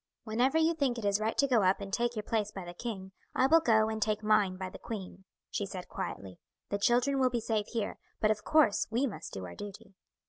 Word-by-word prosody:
"Whenever 245 +6 +2
you 320 +1 +4
think 275 -6 0
it 225 - -4
is 200 0 +2
right 220 +1 -1
to 280 - +4
go 245 -5 +4
up 190 0 +3
and 195 -1 -7
take 240 +1 +1
your 215 - -3
place 210 -1 0
by 190 -3 -7
the 175 - -7
king 190 -2 -6 0.2
I 260 - +4
will 325 +5 +6
go 220 -7 +4
and 220 0 -3
take 215 0 0
mine 210 -3 +3
by 185 0 -5
the - - -10
queen," 190 -4 -7 0.3
she 200 - -2
said 185 -2 -7
quietly. 95 -2 -6 0.3
"The 200 - -1
children 245 +6 +3
will 260 -1 +4
be 240 -1 -1
safe 220 -2 -1
here; 225 -3 -3 0.2
but 215 - +3
of 215 0 -2
course 305 -10 +3
we 240 +5 +1
must 180 - -6
do 95 -1 -5
our 85 - -8
duty." 200 - -9
215 Hz, 245 wpm, -31 LUFS, 195-240 Hz, 0.3 s, will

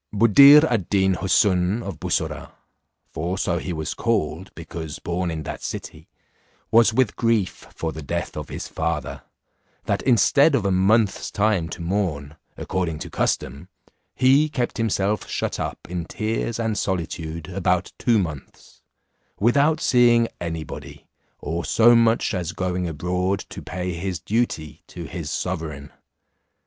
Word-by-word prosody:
Buddir 140 +8 +8
ad 115 - -1
Deen 95 -1 +3
Houssun 95 +3 +2
of 95 -6 -7
Bussorah, - - -2 0.6
for 85 +4 -3
so 85 -2 0
he 90 - -5
was 80 -2 -3
called, 95 -6 -1
because 80 -2 -7
born 90 +1 -2
in 80 -2 -4
that - - -6
city, - - -7 0.6
was 115 +1 +6
with 125 0 +1
grief 115 -5 0
for 80 - -3
the 80 - -8
death 70 - -4
of - - -6
his - - -6
father, - - -3 0.6
that - - 0
instead 140 +5 +4
of 110 -7 0
a 100 - +2
month's 100 +3 +2
time 100 -6 +1
to 85 - -7
mourn, 85 -6 -2 0.2
according 90 -4 -2
to - - -8
custom, 70 +6 -2 0.5
he 135 +4 +4
kept 125 -5 -2
himself 105 -2 0
shut - - -2
up - - -3
in 85 -1 -4
tears 110 +4 -3
and 110 -2 -1
solitude 85 -3 -3
about 90 -1 0
two 120 -2 +3
months, 80 -8 -6 0.6
without 140 +8 +3
seeing 120 -2 +4
any 80 -2 -4
body, - - -10 0.3
or 85 +3 -4
so 120 +1 +5
much 115 -1 +3
as 90 -3 -3
going 90 -1 -2
abroad 90 +4 -1
to - - -8
pay 90 0 -4
his 90 +1 -3
duty 105 -9 -2
to - - -8
his - - -6
sovereign. 80 -6 -4
95 Hz, 145 wpm, -23 LUFS, 85-115 Hz, 0.6 s, Buddir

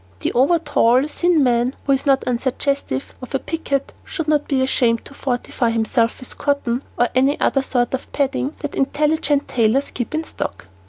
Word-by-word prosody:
The - - -1
over 275 +8 +4
tall, 255 -5 +3
thin 340 -1 +2
man, 245 +1 +2
who 275 - +1
is 270 +2 +1
not 270 -1 +4
unsuggestive 255 - -1
of 255 +2 -6
a - - +1
picket, 280 -4 -3
should 325 -4 -5
not 300 -1 +2
be 265 -3 +1
ashamed 235 -3 +1
to - - -11
fortify 245 -2 -1
himself 230 +1 +1
with 255 - -9
cotton 275 -4 0 0.2
or 240 - +3
any 270 +3 +2
other 270 - +2
sort 245 -2 0
of 265 - -4
padding 280 +1 -1
that 290 - -4
intelligent 290 +1 +1
tailors 240 +4 +1
keep 250 +5 -4
in 315 - -1
stock. 200 - -5
270 Hz, 180 wpm, -20 LUFS, 245-285 Hz, 0.2 s, over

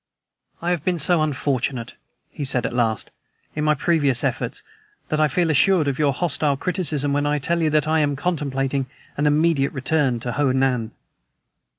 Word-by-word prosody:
"I 175 - 0
have 170 -5 -1
been 180 -1 0
so 170 +1 +3
unfortunate," 135 -4 -1 0.4
he 145 - -6
said 130 -2 +2
at - - -3
last, 115 -3 -1 0.4
"in 150 - -2
my 150 0 +3
previous 145 -4 +1
efforts, - - -2 0.5
that 155 0 0
I 155 - +5
feel 165 +2 +1
assured 165 +1 +3
of 140 0 -2
your 145 -2 +3
hostile 145 -1 0
criticism 150 -5 0
when 145 +1 +1
I 150 0 +1
tell 170 +5 -1
you 160 - +2
that 155 0 +1
I 160 0 +2
am 145 -2 +1
contemplating 135 -4 -2 0.3
an 145 +1 +1
immediate 150 -2 +2
return 130 -2 0
to 120 - -3
Ho 140 +1 +1
Nan!" 130 -4 +1
145 Hz, 180 wpm, -22 LUFS, 135-160 Hz, 0.5 s, I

